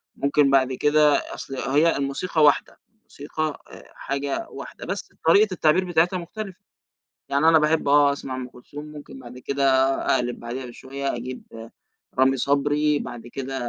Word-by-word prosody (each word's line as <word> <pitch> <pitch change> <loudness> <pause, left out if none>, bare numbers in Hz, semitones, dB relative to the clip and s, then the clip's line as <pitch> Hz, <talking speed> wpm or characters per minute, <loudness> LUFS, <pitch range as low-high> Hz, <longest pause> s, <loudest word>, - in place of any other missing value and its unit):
ممكن 140 0 +2
بعد 130 -1 +3
كده، 150 +2 +4 0.2
أصل 135 - -7
هي 150 +5 +2
الموسيقى 140 +4 -1
واحدة، 145 -1 +3 0.2
الموسيقى 155 -4 -5
أ - - -13
حاجة 140 0 -3
واحدة - - -9
بس - - -5
طريقة 200 +3 +5
التعبير 175 +2 +2
بتاعتها 175 +1 +2
مختلفة. 190 +2 -8 0.7
يعني 140 +3 +2
أنا 160 -1 +6
باحب 155 0 +1
آه 145 0 +5
أسْمَع 135 -2 -6
أم 125 -1 -6
كلثوم، 145 +5 -11
ممكن 150 -3 -11
بعد 125 -1 -11
كده 140 +2 -1 0.5
أقْلِب 125 -1 -2
بعدها 125 +3 -6
بشوية 135 +3 -5
أجيب 120 -2 -8 0.5
رامي 135 0 +4
صبري، 145 +2 +1
بعد 120 0 -8
كده 135 +2 -6
140 Hz, 150 wpm, -24 LUFS, 130-155 Hz, 0.7 s, أنا